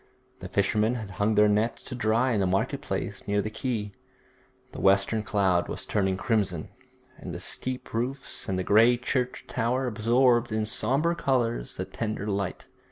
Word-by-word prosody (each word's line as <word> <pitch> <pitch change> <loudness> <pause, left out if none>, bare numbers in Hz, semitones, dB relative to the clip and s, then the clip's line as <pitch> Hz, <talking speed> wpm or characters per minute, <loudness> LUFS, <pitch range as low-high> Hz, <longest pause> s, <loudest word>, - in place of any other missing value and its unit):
The - - -8
fishermen 105 +4 +1
had 110 -5 -6
hung 100 +4 0
their 105 0 +6
nets 105 +3 0
to - - -6
dry 120 +1 +1
in 110 - +1
the 95 - +2
market 95 +2 0
place - - -4
near 100 0 +1
the 110 +1 -2
quay. 110 -3 -3 0.8
The - - -7
western 100 +3 +3
cloud 100 -5 +1
was - - -4
turning 95 -2 0
crimson, 100 -8 -1 0.5
and - - -7
the - - -5
steep 130 0 -1
roofs 125 +2 -3
and 95 -1 -1
grey 115 +4 +5
church 125 0 -2
tower 125 +2 0
absorbed 120 +1 +2
in 110 0 0
sombre 140 +9 +1
colours 120 - -1
the - - -3
tender 110 -2 -4
light. 100 -2 -3
110 Hz, 165 wpm, -27 LUFS, 100-125 Hz, 0.8 s, their